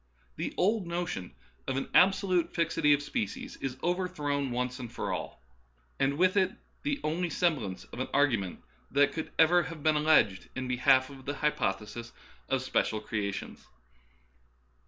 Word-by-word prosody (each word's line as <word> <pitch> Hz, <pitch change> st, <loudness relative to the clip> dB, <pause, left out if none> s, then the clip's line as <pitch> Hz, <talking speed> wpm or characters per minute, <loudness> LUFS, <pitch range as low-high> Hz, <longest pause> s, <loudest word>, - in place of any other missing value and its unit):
The -, -, -4 dB
old 200 Hz, 0 st, +2 dB
notion 170 Hz, -, -4 dB, 0.3 s
of 130 Hz, -, -1 dB
an 135 Hz, -, -2 dB
absolute 185 Hz, -2 st, +4 dB
fixity 165 Hz, -3 st, +2 dB
of 145 Hz, 0 st, +4 dB
species 255 Hz, -, -4 dB
is 130 Hz, -1 st, -4 dB
over 180 Hz, +2 st, +1 dB
thrown 145 Hz, -6 st, -2 dB
once 125 Hz, +1 st, -2 dB
for -, -, -3 dB
all, -, -, -6 dB, 0.6 s
and 140 Hz, +1 st, +1 dB
with 185 Hz, +3 st, +3 dB
it 190 Hz, -1 st, +3 dB, 0.3 s
the 290 Hz, -1 st, -1 dB
only 170 Hz, +3 st, 0 dB
sem 170 Hz, -2 st, +2 dB
blance 95 Hz, -7 st, -6 dB
of -, -, -7 dB
an 130 Hz, -, -1 dB
argument 120 Hz, -11 st, +1 dB, 0.3 s
that 140 Hz, +1 st, +3 dB
could 160 Hz, -, -4 dB
ever 170 Hz, +2 st, +6 dB
have 160 Hz, -2 st, -7 dB
been 155 Hz, -1 st, +4 dB
alleged 150 Hz, -11 st, +3 dB
in 130 Hz, 0 st, -3 dB
behalf 130 Hz, +1 st, +3 dB
of 135 Hz, -1 st, -12 dB
the 145 Hz, +1 st, -2 dB
hypothesis 115 Hz, -5 st, -2 dB, 0.4 s
of 135 Hz, -1 st, +1 dB
special 110 Hz, -4 st, 0 dB
cre 105 Hz, +1 st, -5 dB
ations. 100 Hz, -, -7 dB
145 Hz, 160 wpm, -30 LUFS, 130-175 Hz, 0.6 s, ever